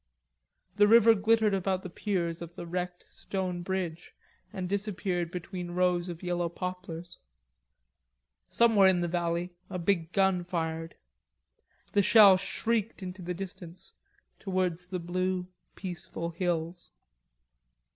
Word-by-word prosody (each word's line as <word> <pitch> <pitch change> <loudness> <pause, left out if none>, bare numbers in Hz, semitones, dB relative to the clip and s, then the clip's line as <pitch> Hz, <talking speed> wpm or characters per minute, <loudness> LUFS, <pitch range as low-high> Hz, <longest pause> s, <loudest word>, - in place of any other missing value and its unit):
The 205 0 +6
river 230 +1 +7
glittered 220 0 +3
about 190 -1 0
the 185 - -6
piers 175 -4 -2
of 170 0 -8
the - - -7
wrecked 180 +1 -4
stone 185 -2 -4
bridge, 175 -2 -4 0.4
and 190 -4 -4
disappeared 190 -3 -2
between 180 0 -6
rows 180 -1 +1
of 170 0 -7
yellow 175 -1 -1
poplars. 175 -1 -6 1.3
Somewhere 225 -5 +5
in 185 -2 +3
the 175 - 0
valley 170 +1 -1 0.2
a 190 - -4
big 170 -2 0
gun 190 -2 +2
fired. 165 -2 -3 1.0
The 205 - +4
shell 200 -1 +8
shrieked 225 +1 -1
into 185 0 -7
the 180 0 -4
distance, 185 -2 -8 0.5
towards 180 -3 -1
the 180 0 -3
blue, 180 +1 -1 0.3
peaceful 175 -2 -5
hills. 170 0 -2
180 Hz, 125 wpm, -29 LUFS, 175-195 Hz, 1.3 s, shell